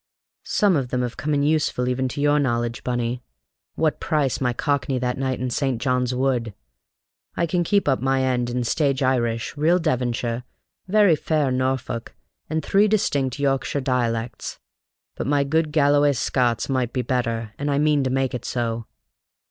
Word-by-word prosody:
Some 200 -4 +3
of 135 -4 0
them 125 0 0
have 120 -1 -4
come 150 0 -1
in 140 - +1
useful 145 -4 +1
even 130 +1 0
to 135 +3 -4
your 145 0 +3
knowledge, 120 -4 -1
Bunny: 120 0 -2 0.5
what 160 -2 0
price 145 -6 0
my 125 -1 +2
Cockney 140 +1 -1
that 125 0 -2
night 130 -2 -1
in 125 0 -2
St. 135 -2 0
John's 125 -1 0
Wood? 125 -5 0 0.8
I 170 - +1
can 175 +1 0
keep 200 0 +1
up 135 -3 +2
my 135 0 +1
end 125 -2 0
in 125 0 -1
stage 140 +2 +1
Irish, 120 -3 0
real 160 +5 +3
Devonshire, 125 -6 -1 0.4
very 200 -3 +5
fair 150 -3 0
Norfolk, 130 -2 -2 0.3
and 160 +1 -2
three 205 +2 +4
distinct 140 - 0
Yorkshire 140 0 0
dialects. 120 -3 -2 0.6
But - - -4
my 145 0 +2
good 155 +2 0
Galloway 145 -1 +4
Scots 120 -2 0
might 130 -3 -1
be 130 -2 -1
better, 115 -3 -2
and 145 +1 -1
I 140 - +1
mean 150 -1 +3
to 130 - 0
make 135 0 0
it 125 - -4
so." 115 -2 -2
130 Hz, 170 wpm, -23 LUFS, 125-145 Hz, 0.8 s, very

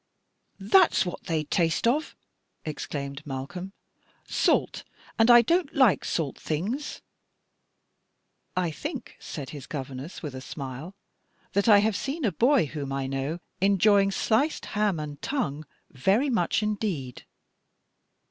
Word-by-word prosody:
"That's 325 - +4
what 175 - -6
they 160 -4 0
taste 165 +6 +1
of," 295 +6 0 0.5
exclaimed 140 -2 -5
Malcolm 145 +7 -6 0.5
"salt; - - +1 0.4
and 225 +2 +5
I 240 0 +9
don't 335 +4 +1
like 240 - +4
salt 150 -6 -2
things." 210 - -3 1.5
"I 175 -3 +1
think," 275 - -6
said 140 -5 -7
his 145 -3 -9
governess, 135 +4 -6
with 150 -4 -5
a 130 - -7
smile, 140 +6 -7 0.6
"that 200 +3 +2
I 205 -2 +8
have 215 -1 +1
seen 280 - -2
a 210 - +2
boy 245 - +3
whom 140 -2 -5
I 135 0 -2
know 135 +4 -2 0.2
enjoying 200 +1 +4
sliced 225 +9 +1
ham 205 -5 +1
and 150 -1 -6
tongue 155 - -2 0.2
very 200 - +2
much 210 -1 +1
indeed." 195 - -3
180 Hz, 130 wpm, -27 LUFS, 145-225 Hz, 1.5 s, I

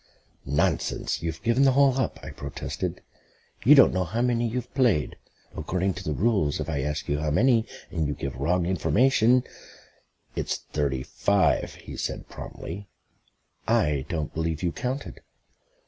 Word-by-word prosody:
"Nonsense; 70 +2 0
you've 80 0 -4
given 115 +3 +2
the 135 -1 +5
hole 135 -1 +4
up," 130 - -1
I - - -7
protested. - - -5 0.6
"You 145 +7 +8
don't 135 - +7
know 95 -1 +1
how 110 +7 -1
many 120 -1 +1
you've 125 +1 -4
played. 120 - +2 0.4
According 95 +1 -1
to - - -8
the 75 - -2
rules, 100 -8 +1
if - - -3
I 75 -4 -1
ask 75 +2 -3
you 75 +1 0
how 75 0 -1
many, 115 - +3 0.2
and 80 -3 -1
you 75 - -2
give 70 +1 -5
wrong 85 +7 +1
information 120 +6 +3 0.4
" - - -37
"It's - - -1
thirty 70 -3 -2
five," 100 +6 +1
he - - -10
said - - -4
promptly. 95 +4 -8 0.8
"I 75 -3 +2
don't 80 -4 -3
believe 80 0 -2
you 85 - +1
counted." 130 +8 -4
95 Hz, 160 wpm, -26 LUFS, 75-120 Hz, 0.8 s, You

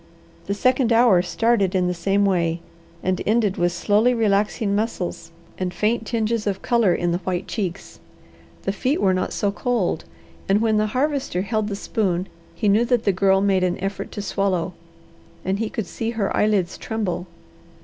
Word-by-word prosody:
The 200 - -1
second 255 +2 +2
hour 230 -6 +5
started 200 +1 +1
in 180 -1 +2
the 180 - 0
same 195 +4 +1
way, 170 -3 +1 0.4
and 185 0 0
ended 215 -3 +1
with 175 0 +2
slowly 210 +7 +2
relaxing 210 -1 +1
muscles 210 -4 -3 0.3
and 185 -1 -1
faint 215 +5 0
tinges 225 -2 -1
of 195 -1 -2
colour 235 -7 +3
in 175 -1 0
the 175 - 0
white 185 0 -3
cheeks. 195 -4 -4 0.6
The 195 - 0
feet 255 +9 0
were 190 -2 +3
not 185 - -1
so 205 - 0
cold, 215 -7 -1 0.4
and 195 +2 +4
when 220 -1 +2
the 215 0 +2
Harvester 275 - 0
held 215 +1 -1
the 205 - -3
spoon 190 -4 -1 0.3
he 215 - -1
knew 205 +3 +4
that 240 -2 +1
the 200 - +3
Girl 195 +1 +3
made 195 -2 +2
an 180 0 0
effort 195 +1 -4
to 205 - -4
swallow, 190 -3 -1 0.7
and 190 +2 0
he 225 -1 -1
could 220 - -3
see 225 +5 -4
her 200 -3 0
eyelids 200 -4 +1
tremble. 185 -5 -3
200 Hz, 180 wpm, -22 LUFS, 185-225 Hz, 0.7 s, hour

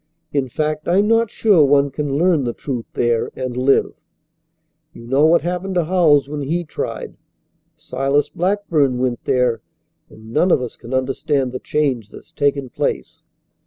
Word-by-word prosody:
In 135 -3 0
fact, 155 +3 -2
I'm 195 +4 +3
not 230 0 +3
sure 205 -7 +4
one 140 0 +3
can 140 0 -2
learn 170 -3 +2
the 120 -1 -2
truth 125 -5 -5
there 120 -1 0
and 130 -2 -4
live. 130 +2 +2 1.0
You 115 - -12
know 135 +5 +3
what 170 +1 +4
happened 180 +2 -3
to 175 - +2
Howells 155 -5 +3
when 145 0 -5
he 165 +6 -1
tried. 155 - -6 0.6
Silas 140 +2 -1
Blackburn 165 -8 0
went 125 -1 -2
there, 125 -3 +1 0.5
and 110 +1 -14
none 175 +7 +3
of 170 - +4
us 125 -2 -6
can 120 - -12
understand 135 +1 -1
the 130 - -5
change 130 -8 -1
that's - - -14
taken 140 -1 0
place. - - -3
140 Hz, 160 wpm, -19 LUFS, 130-165 Hz, 1.0 s, sure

